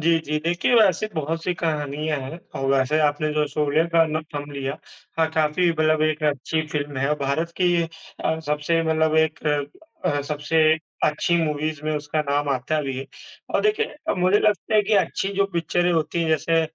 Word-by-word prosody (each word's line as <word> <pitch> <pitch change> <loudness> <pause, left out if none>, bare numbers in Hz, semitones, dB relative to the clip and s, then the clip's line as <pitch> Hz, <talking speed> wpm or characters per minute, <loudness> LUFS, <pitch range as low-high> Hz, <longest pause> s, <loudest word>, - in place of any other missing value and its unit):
जी, 165 +1 +3
जी। 150 +1 -1
देखिए 175 +8 +1
वैसे 215 -2 +4
बहुत-सी 165 +3 -2
कहानियाँ 150 -2 -2
हैं 135 +6 -7 0.2
और 135 - -2
वैसे 135 +3 +2
आपने 150 0 +1
जो 150 0 +1
सोवियर 150 +2 +1
का 165 -1 +6
ना 155 0 -1 0.2
नाम 145 0 -5
लिया, 140 0 -4 0.4
हाँ, 160 - +4
काफ़ी 160 +3 +2
मतलब 155 -1 +2
एक 155 0 0
अच्छी 150 +2 0
फ़िल्म 145 -2 -4
है 135 +2 0
और 150 - +1
भारत 155 +5 -1
की 175 -1 +3 0.4
अ, 160 - +1
सबसे 150 +3 +1
मतलब 160 -1 +1
एक 160 0 +2 0.7
अ, 145 -5 +1
सबसे 150 +2 0 0.4
अच्छी 155 +3 +1
मूवीज़ 155 0 -2
में 155 - -1
उसका 150 +1 -2
नाम 145 0 +1
आता 130 +2 -1
है 155 - +1
भी 135 -1 -3
है 135 - -5 0.5
और - - +4
देखिए 425 +1 +2 0.2
अ, - - +2
मुझे 185 +2 +3
लगता 210 -1 +1
है 210 - +6
कि 210 - +1
अच्छी 190 0 +1
जो 200 - +4
पिक्चरें 175 +1 +1
होती 165 +1 0
हैं, 165 - -1
जैसे 160 +1 +2
155 Hz, 195 wpm, -23 LUFS, 150-165 Hz, 0.7 s, का